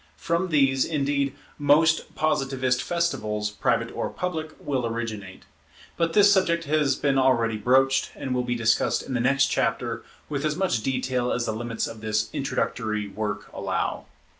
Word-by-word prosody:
From 170 +3 -1
these, 135 -4 +3
indeed, 140 -3 0 0.2
most 155 +3 +3
Positivist 135 -4 0
festivals, 105 -12 -1
private 105 - 0
or - - -2
public, 160 -3 -3
will 130 -4 -1
originate. 110 -5 -5 0.5
But 165 -1 0
this 205 -1 +6
subject 170 -3 +2
has 150 -3 +2
been 140 -2 +1
already 120 -4 +2
broached, 130 +4 +3
and 130 - -4
will 125 - +1
be 120 0 -2
discussed 115 -1 +1
in 130 - -6
the 125 - 0
next 135 +3 +3
chapter - - -1 0.3
with 145 -1 -3
as 155 -1 0
much 180 - 0
detail 125 0 -1
as 120 - 0
the - - -1
limits 115 +1 -3
of 110 -1 -8
this 110 0 -1
introductory 110 -6 -2
work 105 +1 -4
allow. - - -2
130 Hz, 160 wpm, -25 LUFS, 115-150 Hz, 0.5 s, this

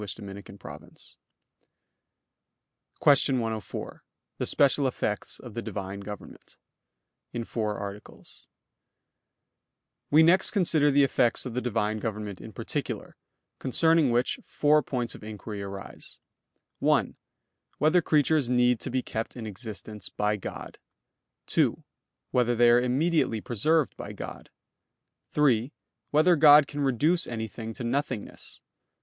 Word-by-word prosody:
_______________________ 100 0 -10 1.8
QUESTION 140 -2 +4
104 110 -4 -5 0.4
THE - - -1
SPECIAL 140 -1 +3
EFFECTS 105 -5 -3
OF 120 -4 -10
THE 115 - -4
DIVINE 100 -3 -5
GOVERNMENT 105 0 -10 0.8
(In 120 -1 -3
Four 110 -2 -3
Articles) 100 0 -10 1.6
We 155 +2 +6
next 180 +4 +6
consider 160 -7 +3
the 140 0 +4
effects 125 -3 +1
of 125 - -5
the 125 - -1
Divine 110 -3 -1
government 105 -3 -5
in - - -9
particular; - - -5 0.4
concerning 160 +2 +3
which 120 +1 +1
four 150 +1 +3
points 120 -5 -3
of - - -12
inquiry 105 -1 -7
arise: 100 0 -8 0.6
(1) - - +2 0.6
Whether 155 +5 +3
creatures 150 -3 +2
need 125 -1 +3
to - - -5
be 130 0 -1
kept 110 +3 -5
in 115 - -6
existence 105 -1 -7
by 105 0 0
God? 105 - -8 0.7
(2) - - +1 0.5
Whether 120 -1 +2
they 120 0 +5
are 120 +1 +5
immediately 135 -1 +1
preserved 145 +8 +1
by - - -7
God? - - -8 0.8
(3) 135 -4 +2 0.4
Whether 155 +4 +4
God 150 -1 +8
can 145 +1 -5
reduce 150 +7 +2
anything 110 -1 -5
to - - -6
nothingness? 130 -2 -3
120 Hz, 120 wpm, -27 LUFS, 105-145 Hz, 1.8 s, God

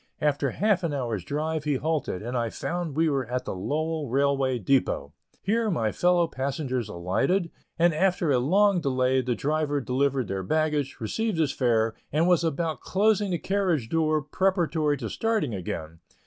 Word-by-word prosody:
After 145 -2 +1
half 205 - +1
an 160 -4 -1
hour's 115 -8 -2
drive 155 - -2
he 150 -2 +1
halted, 145 - -2
and 120 +3 -4
I 120 -2 0
found 170 +3 -4
we 165 0 +3
were 135 -5 0
at 125 +1 -3
the - - -3
Lowell 155 - -2
Railway 135 0 +1
depot. 100 - 0 0.3
Here 225 +3 +1
my 115 - 0
fellow 175 +3 +3
passengers 130 -4 -3
alighted, 135 - 0 0.3
and 170 0 +4
after 175 -1 +1
a 130 - +3
long 190 +7 +3
delay 130 -2 +2
the 125 -1 -1
driver 150 +1 0
delivered 135 -1 0
their 95 0 -2
baggage, 150 +4 0
received 210 - -2
his 155 -4 +2
fare, 115 -4 +1 0.2
and 160 +4 +2
was 175 -2 +4
about 160 -2 -1
closing 205 +1 +2
the 175 - 0
carriage 180 - 0
door 155 -2 +1
preparatory 165 -3 +1
to 120 -4 -4
starting 215 - -1
again. 80 -4 -5
145 Hz, 170 wpm, -26 LUFS, 125-170 Hz, 0.3 s, and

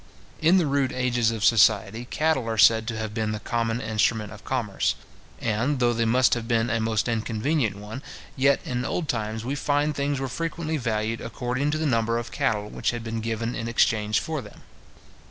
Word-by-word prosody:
In 165 +4 +5
the 175 - +3
rude 140 -2 +1
ages 125 -3 +1
of 110 -2 -1
society, 110 0 +4
cattle 150 -3 0
are 110 - -2
said 110 +2 +5
to 115 -2 -3
have 110 -1 -4
been 110 -1 -1
the 105 - -4
common 115 +1 -1
instrument 110 -1 0
of 105 0 -13
commerce; 105 - -1 0.4
and, 115 +6 0
though 120 -1 +3
they 115 0 0
must 125 +3 +4
have 115 -2 -2
been 115 0 +1
a 115 - +1
most 110 0 0
inconvenient 115 +2 0
one, 105 +5 -8 0.3
yet, 135 +1 +3
in 125 -1 -2
old 160 +4 -2
times, 110 -2 -2
we 135 - -2
find 145 +1 0
things 140 -1 -1
were 135 - -2
frequently 160 +3 -3
valued 115 -2 -2
according 125 +4 -2
to 155 - 0
the 160 - -1
number 115 -4 +1
of 120 0 -5
cattle 110 -7 0
which - - -2
had 120 -1 -3
been 115 0 -3
given 115 +1 -2
in 115 -1 -4
exchange 110 -2 +2
for 160 -3 -3
them. 105 - -14
115 Hz, 200 wpm, -25 LUFS, 110-135 Hz, 0.4 s, In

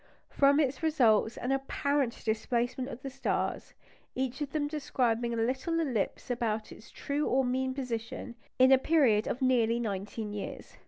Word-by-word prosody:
From 280 +1 +4
it 275 -3 0
results 240 -9 +3
an 250 - -2
apparent 270 -1 -1
displacement 240 +3 -1
of 250 -1 -9
the 270 - -4
stars, 270 +1 -2 0.4
each 260 +1 -2
of 290 - -2
them 295 -2 0
describing 245 -6 0
a 235 - -2
little 260 +9 0
ellipse 250 -5 -2
about 225 -3 -2
its 215 - -13
true 290 +1 -2
or 265 +1 +2
"mean" 260 +1 -1
position, 235 -2 -4 0.2
in 260 +1 +6
a 265 - +7
period 260 -9 +3
of 260 - -2
nearly 235 -2 +3
nineteen 210 0 -4
years. 205 - -7
255 Hz, 160 wpm, -30 LUFS, 230-275 Hz, 0.4 s, a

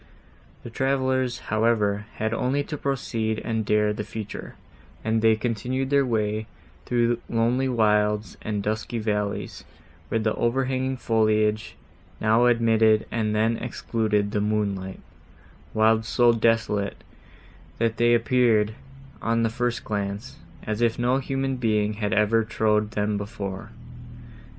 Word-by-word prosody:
The 120 - -8
travellers, 130 -1 0 0.2
however, 105 -2 +1
had 110 +1 -1
only 130 +5 0
to 150 - -5
proceed 115 -6 -2
and 110 -1 -1
dare 105 0 +2
the 105 - -4
future; 105 -1 -7 0.5
and 110 0 +1
they 110 0 +5
continued 125 +4 -2
their 140 -2 +3
way 110 -1 -1 0.4
through 120 -1 +1
lonely 120 +3 +1
wilds 105 -3 +1
and 105 -2 -3
dusky 110 +3 -2
valleys, 105 -2 -2 0.5
where - - 0
the 110 -1 0
overhanging 130 +2 0
foliage 110 -2 +1 0.4
now 110 +3 +4
admitted, 115 -2 +3
and 110 -2 -1
then 110 +2 +2
excluded 110 -4 -1
the 105 - 0
moonlight; 100 -3 -2 0.7
wilds 110 +1 +3
so 120 0 +4
desolate, 110 -3 0 0.7
that 115 0 0
they 120 0 +4
appeared, 115 -3 +2 0.5
on 115 0 +1
the 115 - +2
first 120 +1 -2
glance, 100 +3 -4 0.3
as 110 +1 -3
if 115 -1 +2
no 125 +2 +2
human 135 0 -2
being 110 -3 +1
had 105 -1 0
ever 105 +3 +3
trod 105 -1 +1
them 105 -1 -1
before. 100 -2 -6
110 Hz, 130 wpm, -25 LUFS, 105-120 Hz, 0.7 s, they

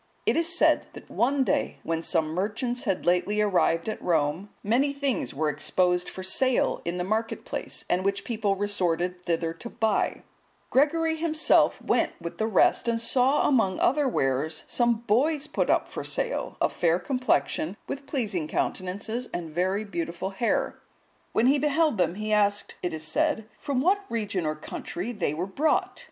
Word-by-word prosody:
It - - +3
is 330 0 +2
said 340 - +3
that - - -12
one 270 +3 +2
day, - - 0
when 165 0 -1
some 165 -2 0
merchants 225 +7 -2
had 195 -4 -1
lately 180 +4 +2
arrived 180 -4 +2
at 220 - -3
Rome, 165 +3 0
many 260 +7 +2
things 275 - -1
were 155 +3 -1
exposed 180 +4 +1
for 185 - -7
sale 255 +7 +2
in 170 +1 -3
the 180 - -1
market 220 +4 -2
place, - - -5
and 180 - +1
much 195 +1 0
people 215 -4 0
resorted 180 -3 -1
thither 165 -1 0
to 200 +8 -8
buy: 220 -3 0 0.5
Gregory 320 +4 +2
himself 315 -1 +3
went - - +1
with 170 -1 -7
the 220 - +1
rest, 225 +2 +3
and 230 -1 +1
saw 255 +4 +3
among 225 -9 +2
other 285 +1 +3
wares 150 - 0
some 235 -2 +1
boys 280 +7 +2
put - - -1
up - - +2
for - - -6
sale, - - -3
of - - +1
fair 170 0 +2
complexion, 205 - 0
with 280 0 -6
pleasing 215 - -2
countenances, 200 +9 -2
and 165 -2 -5
very 185 +5 0
beautiful 175 0 -4
hair. 215 +5 -1 0.5
When 225 - +2
he 280 +3 +4
beheld 300 - +2
them, 175 0 +2
he 215 +1 -2
asked, 205 -1 +2
it 180 - -2
is 155 -1 -5
said, 290 - 0
from 275 -3 -1
what 385 +7 +3
region 205 -7 -2
or 155 - -1
country 175 +6 -5
they 175 -10 -2
were 170 +4 -2
brought? 290 +11 0
205 Hz, 170 wpm, -26 LUFS, 175-255 Hz, 0.5 s, he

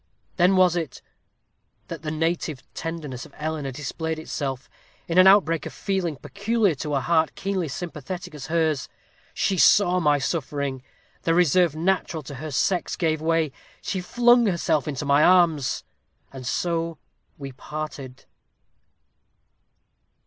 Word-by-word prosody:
Then 185 +1 +4
was 185 -2 +4
it 165 -4 -4 0.8
that - - -7
the 155 - -4
native 160 -2 -2
tenderness 150 -6 -5
of - - -22
Eleanor 150 -2 -3
displayed 155 +4 -4
itself, 135 -5 -4 0.4
in 170 +2 +3
an 185 - +8
outbreak 180 -5 +4
of - - -9
feeling 190 -5 -2
peculiar 200 - 0
to 150 +1 -3
a - - +2
heart 160 +3 +1
keenly 190 -3 -2
sympathetic 175 +3 -6
as 145 -3 -8
hers. 160 -4 0 0.5
She 190 -2 0
saw 180 -3 +5
my 150 -4 +3
suffering 140 -3 -2 0.4
the 165 - +1
reserve 175 -1 +3
natural 170 -1 -1
to 140 - -9
her 155 - -5
sex 175 +6 0
gave 160 -3 0
way 165 -2 +1 0.3
she 190 - -3
flung 240 +4 +4
herself 165 -5 0
into 145 -1 -3
my 140 +2 +4
arms 165 -7 +3 0.5
and 130 -2 -7
so 165 +1 -1 0.4
we 140 -2 -7
parted. 140 -1 -7
160 Hz, 135 wpm, -24 LUFS, 145-180 Hz, 0.8 s, an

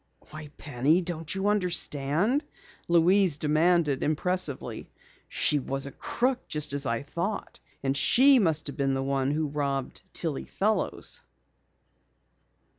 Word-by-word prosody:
"Why, 155 0 -9
Penny, 145 +5 +1
don't 165 -1 -3
you 195 +1 -1
understand?" 180 - +1 0.4
Louise 175 0 +3
demanded 155 -1 +2
impressively. 155 -1 -1 0.4
"She 150 - +2
was 135 +1 -3
a 140 - -7
crook 250 - -2
just 150 -2 -2
as 140 -1 -1
I 115 +2 -1
thought. 170 +8 -5 0.2
And 135 0 0
she 260 - +6
must 160 -7 +1
have 145 - -6
been 135 -1 0
the 135 - -2
one 135 0 0
who 155 +2 -1
robbed 140 -2 -3
Tillie 160 -5 -4
Fellows!" 215 +2 -2
155 Hz, 125 wpm, -27 LUFS, 140-180 Hz, 0.4 s, she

